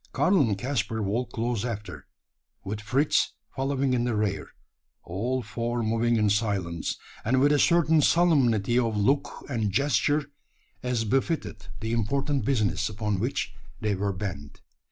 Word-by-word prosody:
Karl 185 -2 +3
and 110 -7 +1
Caspar 115 -1 -2
walked 115 +5 -2
close 115 -2 -1
after, 100 - -6 0.6
with 105 +2 -4
Fritz 130 +9 +1 0.2
following 135 0 0
in 120 -1 +1
the 120 -2 0
rear 105 -2 -1 0.6
all 120 +8 -2
four 115 +1 -2
moving 115 +2 +1
in 105 -1 +3
silence, 100 -5 -1 0.3
and 130 +4 +2
with 145 +2 +4
a 145 - +3
certain 160 -2 +4
solemnity 125 - +3
of 115 -3 0
look 135 +8 0
and 110 -7 -1
gesture 140 +5 +2 0.6
as 125 -3 -1
befitted 135 +2 -1
the 110 0 -3
important 135 +5 0
business 110 -5 +1
upon 105 -2 -2
which 120 +6 -2 0.3
they 105 -1 0
were 100 +1 -1
bent. 90 -7 -6
115 Hz, 145 wpm, -27 LUFS, 105-135 Hz, 0.6 s, with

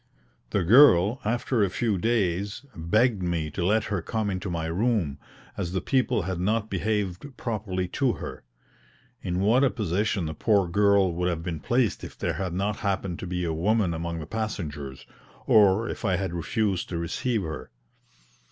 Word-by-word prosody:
The - - 0
girl, 110 - +6
after 120 +1 +1
a 100 - +2
few 105 0 0
days, 105 +1 0
begged 105 +6 +2
me 85 -3 -1
to 85 - -3
let 105 +4 +2
her 100 -4 -2
come 110 +3 -2
into 95 +1 -4
my 85 -2 -2
room, 85 - 0 0.4
as 90 -3 -3
the 95 - +1
people 125 -1 +1
had 95 -1 -3
not 110 +4 0
behaved 105 +5 -2
properly 95 -5 -2
to 130 +3 +1
her. - - -7 0.8
In 90 -1 -2
what 115 +7 +4
a 135 - +5
position 100 -3 -1
the 80 - -3
poor 100 +3 +2
girl 100 0 +3
would 90 +1 0
have 85 -2 -3
been 85 -3 -4
placed 120 - 0
if - - -9
there - - -1
had 90 +2 -3
not 100 +3 -1
happened 95 -4 -2
to 95 - -5
be 90 0 -2
a 80 - -1
woman 95 +2 +1
among 85 +1 -3
the 80 - -6
passengers, 75 -10 -5 0.4
or 105 +1 +5
if - - -6
I 95 -4 +2
had 95 -1 -2
refused 95 +2 -1
to 85 - -3
receive 100 +7 -1
her! 80 -2 -6
95 Hz, 180 wpm, -26 LUFS, 85-110 Hz, 0.8 s, girl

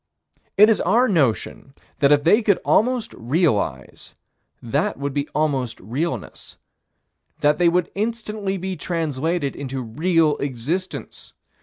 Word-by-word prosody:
It 210 +2 +8
is 220 - +2
our 245 +3 +3
notion 135 - 0 0.3
that 140 -1 +4
if 145 -1 +4
they 205 +8 +5
could 205 -4 +3
almost 245 +1 +1
realize, 115 - -1 0.4
that 115 - -1
would 140 0 -3
be 145 +1 -2
almost 140 -6 -1
realness: 125 - -5 0.8
that 150 +2 +3
they 175 -1 +5
would 175 0 0
instantly 210 -2 -3
be 190 +1 -4
translated 160 -2 -2
into 135 -1 -5
real 155 +6 +1
existence. 145 +8 -5
155 Hz, 125 wpm, -22 LUFS, 135-190 Hz, 0.8 s, It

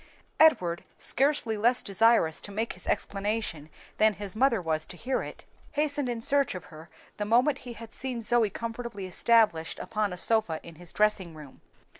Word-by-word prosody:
Edward, 180 - +4
scarcely 270 -5 0
less 240 +4 +3
desirous 200 -5 +3
to 205 - -5
make 220 +3 -2
his 185 - -9
explanation 200 -7 -2 0.3
than 215 -1 +4
his 200 +1 -7
mother 240 -1 +3
was 160 -3 -2
to 175 - -9
hear 255 +6 -1
it, - - -9 0.3
hastened 290 -3 0
in 235 -1 -3
search 280 -2 +1
of 180 - -7
her 155 +1 -12 0.3
the 210 - -2
moment 250 +7 +3
he - - -6
had 230 0 -10
seen 250 -3 -4
Zoe 230 -1 +2
comfortably 230 -1 -6
established 185 -3 +2
upon 210 -2 -2
a 180 - -6
sofa 190 -6 +1
in 170 - -11
his 175 0 -7
dressing 205 -6 +2
room. 150 -4 -13
215 Hz, 175 wpm, -28 LUFS, 180-235 Hz, 0.3 s, Edward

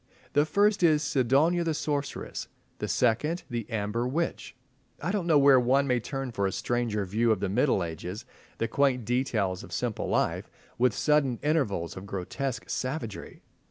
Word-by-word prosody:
The 145 +1 +3
first 205 +3 +3
is 155 -3 +4
"Sidonia 140 +6 +2
the 165 -2 -1
Sorceress," 145 -1 -3 0.3
the - - -2
second, 150 +9 +1
"The 120 -2 -4
Amber 110 +2 -1
Witch." 165 +6 -3 0.4
I 180 - -2
don't 195 -4 -1
know 160 -3 +5
where 140 -2 +7
one 130 +3 +3
may 125 -2 +2
turn 135 +2 -4
for 100 -4 0
a - - -2
stranger 115 -2 -1
view 110 +5 +1
of 110 - +1
the 100 -1 -1
Middle 120 -1 +2
Ages, 90 +7 -6 0.3
the 115 - 0
quaint 130 -4 +1
details 110 -7 0
of 85 - -12
simple 115 +5 -2
life, - - 0 0.3
with 125 +1 +3
sudden 150 -5 +2
intervals 135 - 0
of 95 +2 -8
grotesque 115 +7 -4
savagery. 130 -5 -4
125 Hz, 165 wpm, -28 LUFS, 110-145 Hz, 0.4 s, where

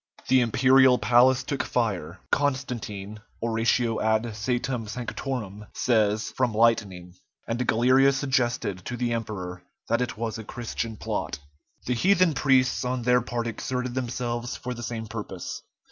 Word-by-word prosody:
The 130 -1 +5
imperial 130 +2 +5
palace 125 +2 +4
took 135 0 -2
fire, 95 -7 -2
Constantine 120 -7 -2 0.2
("Oratio 115 0 +1
ad 110 0 +2
Coetum 120 +1 -2
Sanctorum") 110 -3 -5
says, 110 -3 +1
from 125 -4 0
lightning, 100 -6 +1 0.3
and 120 +2 -2
Galerius 130 +4 +4
suggested 120 -8 0
to 120 - -4
the 120 0 0
emperor 95 -6 -4 0.3
that 115 +2 +2
it 125 -3 -2
was 115 -1 -3
a - - -6
Christian 115 -1 -5
plot. - - -3 0.5
The 125 - 0
heathen 185 +5 +3
priests 135 -2 +2
on 125 -1 -2
their 125 +1 +4
part 120 0 -3
exerted 125 +2 -3
themselves 120 -1 -3
for 125 - -5
the 120 - -8
same 115 -1 -4
purpose. 105 -5 -6
120 Hz, 140 wpm, -26 LUFS, 110-125 Hz, 0.5 s, The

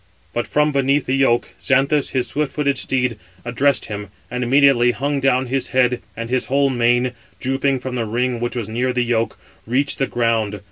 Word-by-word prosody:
But 120 - -2
from 150 0 +2
beneath 140 0 +1
the 130 - 0
yoke, 135 -3 +2
Xanthus, 140 +1 +2
his 130 -2 0
swift 140 +3 -2
footed 140 -2 +1
steed, 125 -4 -1 0.3
addressed 130 +3 +1
him, 105 -2 -6 0.2
and 125 0 -2
immediately 130 -1 +4
hung 140 +2 -1
down 130 -1 +2
his 130 +1 -1
head, 125 -2 +1 0.2
and 115 0 -4
his 130 +1 0
whole 140 0 +2
mane, 120 0 +2 0.3
drooping 135 +1 0
from 130 0 -5
the 120 -2 -1
ring 120 +2 -1
which 120 +1 -3
was 115 -4 -3
near 125 +3 -1
the 125 -1 +1
yoke, 115 -1 0 0.3
reached 135 +5 0
the 135 - +1
ground. 115 -3 0
125 Hz, 190 wpm, -20 LUFS, 120-135 Hz, 0.3 s, immediately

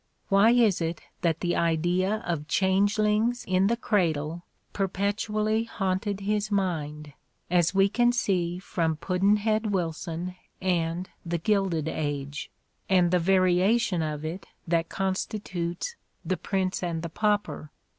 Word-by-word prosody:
Why 200 +2 +6
is 230 -7 +4
it 165 0 -3 0.2
that 165 -2 0
the 175 -1 0
idea 175 +6 +1
of 155 -4 -2
changelings 210 +5 +2
in 185 +1 +2
the 235 +2 +1
cradle 170 -7 0 0.3
perpetually 210 +3 0
haunted 195 -1 -2
his 210 +1 0
mind, 150 -7 -2 0.4
as 175 +1 +3
we 195 0 +5
can 240 +3 +3
see 180 -7 0
from 165 -3 -1
"Puddn'head 210 +5 +1
Wilson" 175 -1 -2 0.3
and 175 -1 0 0.2
"The 170 0 -2
Gilded 185 -4 +1
Age" 145 -2 -3 0.4
and 180 -2 +4
the 180 - +4
variation 185 +3 +3
of 155 -1 -3
it 170 +5 -5 0.2
that 165 0 +1
constitutes 190 - -3 0.3
"The 185 +2 0
Prince 190 -2 -1
and 170 -2 -2
the 170 - -3
Pauper"? 205 -6 -1
185 Hz, 125 wpm, -27 LUFS, 165-205 Hz, 0.4 s, Why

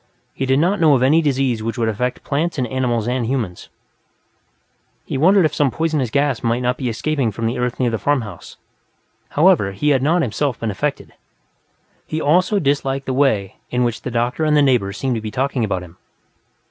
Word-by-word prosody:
He 135 - -3
did 130 0 +3
not 180 +7 +2
know 155 -4 +5
of 130 - +1
any 155 +5 +4
disease 135 -6 0
which 115 +3 -4
would 115 -1 0
affect 125 +4 -2
plants 155 +4 -1
and 130 - 0
animals 120 -3 -1
and 125 0 0
humans; 115 -9 -3 1.4
he - - -5
wondered 180 +6 +4
if 155 - 0
some 145 -2 +2
poisonous 155 -3 -1
gas 140 0 0
might 115 +1 0
not 125 0 +1
be 125 -1 -3
escaping 135 +1 -1
from 115 +3 -4
the 115 +2 -1
earth 125 0 -2
near 125 -2 +1
the 115 - -2
farmhouse. 115 -11 -3 0.7
However, 150 - +3
he 150 +10 0
had 135 -3 +3
not, 165 +5 +2
himself, 130 +2 -2
been 115 -2 -2
affected. 140 +9 -3 0.9
He 155 - -3
also 180 +7 +2
disliked 140 -4 0
the 130 - -2
way 110 -8 +1
in 125 0 0
which 120 -2 -2
the - - -4
doctor 120 +5 -1
and 150 -1 +3
the 145 - +5
neighbors 110 -7 +1
seemed 130 -3 -1
to - - -4
be 110 - -5
talking 130 +2 -1
about 95 -4 -2
him. 90 0 -14
130 Hz, 200 wpm, -19 LUFS, 115-145 Hz, 1.4 s, know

